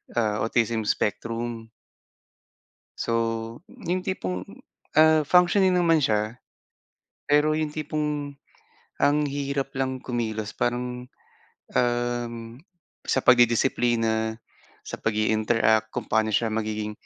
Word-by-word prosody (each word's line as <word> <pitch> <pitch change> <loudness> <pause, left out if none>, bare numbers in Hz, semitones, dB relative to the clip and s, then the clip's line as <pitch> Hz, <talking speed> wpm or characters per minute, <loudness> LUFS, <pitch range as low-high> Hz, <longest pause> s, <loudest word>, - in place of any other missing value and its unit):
ah, 105 -3 0
autism 115 -1 0
spectrum. 115 +2 -2 1.3
So, 115 - -2 0.6
yung 185 -8 -3
tipong, 95 - -3 0.6
ah, 155 0 +6
functioning 180 +1 +4
naman 165 -3 +4
siya. 110 -1 0 0.9
Pero 150 +1 +4
yung 155 0 0
tipong, 150 -1 -3 0.7
ang 145 +1 +3
hirap 140 -1 -2
lang 130 -1 -2
kumilos 110 -3 -3
parang, 125 +1 -2 0.7
um, 120 -1 0 0.7
sa 130 - +1
pagdidisiplina, 115 -2 +3 0.5
sa - - -6
pag-iinteract. 110 0 +2
Kung 120 -3 -5
paano 110 0 +1
siya 110 +1 0
magiging 110 -1 -2
120 Hz, 95 wpm, -25 LUFS, 110-145 Hz, 1.3 s, ah